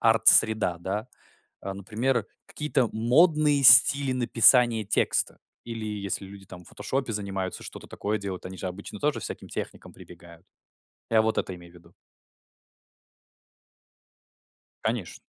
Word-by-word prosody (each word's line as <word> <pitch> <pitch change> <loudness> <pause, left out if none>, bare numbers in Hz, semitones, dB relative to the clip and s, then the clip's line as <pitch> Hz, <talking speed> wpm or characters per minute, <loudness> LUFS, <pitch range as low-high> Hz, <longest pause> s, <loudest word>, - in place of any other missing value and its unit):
арт-среда, 110 -4 +4
да? 105 +7 -4 0.5
А 95 0 -6
например, 110 +4 -2 0.2
какие-то 150 -5 -1
модные 145 +5 +3
стили 140 +1 +7
написания 120 -2 +3
текста. 100 - 0 0.3
Или 115 -2 -6
если 100 -2 -4
люди, 100 0 -13
там, 90 -1 -13
в - - -13
"Фотошопе" 130 -3 -4
занимаются, 95 -3 -5
что-то - - -10
такое 105 +1 -3
делают, 95 -3 -6
они 95 0 -10
же - - -5
обычно 100 +3 -8
тоже 150 +4 -1
всяким - - -7
техникам - - -7
прибегают. 85 0 -15 0.7
Я 110 -1 +4
вот 110 0 -1
это 95 - -3
имею 85 -1 -14
в - - -24
виду. 85 - -20 2.9
Конечно. - - -3
110 Hz, 130 wpm, -26 LUFS, 95-125 Hz, 2.9 s, стили